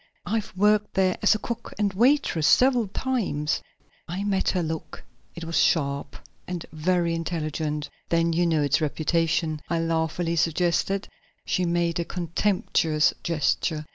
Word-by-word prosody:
I've 220 -1 -2
worked 210 +1 +2
there 185 -1 +3
as 215 - +4
cook 235 - -5
and 205 -2 0
waitress 230 - +3
several 250 - +4
times." 195 - -1 0.5
I 180 +3 -3
met 195 -2 +1
her 180 -2 0
look; 160 -1 -5 0.3
it 170 - -7
was 165 +1 -2
sharp 140 -3 +1 0.3
and 175 -2 -4
very 170 +2 +1
intelligent. 155 -2 -3 0.2
"Then 165 0 +2
you 175 +1 +2
know 160 -3 +2
its 145 +2 +2
reputation," 160 0 0
I 170 - +1
laughingly 165 +1 -1
suggested. 175 +4 +1 0.4
She 180 - 0
made 170 0 0
a 170 - -1
contemptuous 170 -3 +1
gesture. 155 -1 0
170 Hz, 140 wpm, -25 LUFS, 160-190 Hz, 0.5 s, as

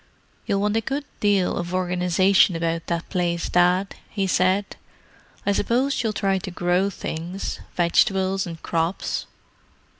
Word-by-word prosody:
"You'll 200 0 +1
want 210 +1 +1
a - - +2
good 275 +5 -3
deal 200 -3 +2
of 175 +1 -3
organization 180 +1 +3
about 165 0 -2
that 170 -1 -2
place, 175 -2 -1
Dad," 180 +2 +3 0.2
he 200 -2 -1
said. 185 +2 +1 0.7
"I 200 - +3
suppose 245 +7 +1
you'll 225 - 0
try 195 -2 0
to 190 - -6
grow 180 +2 +1
things—vegetables 185 +2 -1
and 165 -1 -7
crops?" 165 +2 -1
185 Hz, 130 wpm, -23 LUFS, 175-200 Hz, 0.7 s, organization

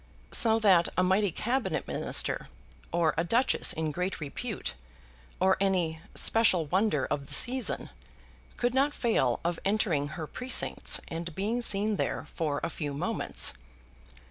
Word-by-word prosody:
So 225 -1 +4
that 190 -6 +4
a 185 - +3
mighty 190 +1 +2
Cabinet 245 - -2
Minister, - - +1 0.4
or 170 -2 +1
a 165 - +2
duchess 235 +9 +2
in 160 -1 -2
great 180 +4 -3
repute, 180 - -5 0.7
or 190 0 +3
any 180 -5 0
special 200 -7 +3
wonder 175 -3 +1
of 140 -1 -3
the - - +2
season, 255 0 +2 0.7
could 245 0 0
not 280 +3 +1
fail 135 - +1
of 170 0 -1
entering 190 -8 0
her 160 - -4
precincts 250 +11 -1
and 165 0 -6
being 220 +6 -1
seen 210 -1 +2
there - - -2
for 150 -4 -2
a - - -1
few 145 -3 -4
moments. - - 0
190 Hz, 145 wpm, -28 LUFS, 160-225 Hz, 0.7 s, So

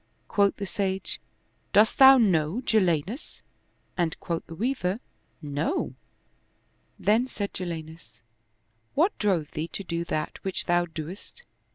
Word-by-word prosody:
Quoth 200 -1 +3
the 200 - -3
sage, 190 0 -2 0.3
" - - -42
Dost 210 +1 +5
thou 270 0 +10
know 180 -4 +2
Jalinus? 200 - 0 0.3
" - - -42
and 165 -3 0
quoth 170 -1 -3
the 165 - -8
Weaver, 220 -2 -1 0.3
" - - -41 0.2
No." 285 - 0 1.0
Then 220 +5 +2
said 205 -5 -4
Jalinus, 160 -8 -7 0.4
" 110 +1 -44
What 345 +8 +3
drove 185 -8 +1
thee 155 +2 -3
to 200 - -6
do 170 -2 -2
that 155 -2 -3
which 190 -1 -1
thou 175 0 +2
dost?" 170 - -8
185 Hz, 145 wpm, -27 LUFS, 160-215 Hz, 1.0 s, thou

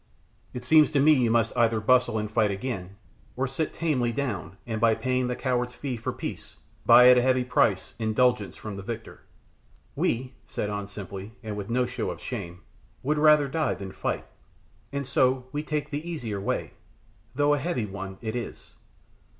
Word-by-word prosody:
It 125 0 -7
seems 155 +1 +6
to 145 -2 +1
me 155 +3 +6
you 125 -5 +2
must 115 0 +2
either 115 -2 +3
bustle 125 +1 +3
and 105 0 -3
fight 110 -2 +3
again, 100 -2 -4 0.4
or 130 - 0
sit 140 +4 -2
tamely 130 -8 0
down, 100 - -3
and 110 -2 -3
by 115 -1 +5
paying 130 0 0
the 125 - -1
coward's 125 -1 -1
fee 135 -3 -4
for 110 - -3
peace, - - -7 0.3
buy 125 0 +9
at 125 - +8
heavy 130 0 +3
price, 110 -6 +1
indulgence 110 -1 +1
from 105 -2 -7
the - - -5
victor." 110 +3 -7 0.7
"We," 125 +2 -1
said 105 - -3
An 100 -1 -4
simply, 100 +1 -8
and 110 -2 -4
with 105 0 -6
no 125 +2 +2
show 125 0 -3
of - - -6
shame, 90 -8 -6 0.4
"would 150 +3 +1
rather 150 -1 +6
die 155 +3 0
than 95 -1 -7
fight, - - -3 0.7
and 140 0 -3
so 130 0 +2
we 145 - -2
take 150 -1 -3
the 150 +4 -4
easier 115 -12 -4
way, 100 - -2 0.6
though 145 +1 +3
a 145 - +1
heavy 135 -6 -1
one 95 -1 -7
it 110 0 -4
is. 120 - -6
125 Hz, 180 wpm, -27 LUFS, 105-135 Hz, 0.7 s, buy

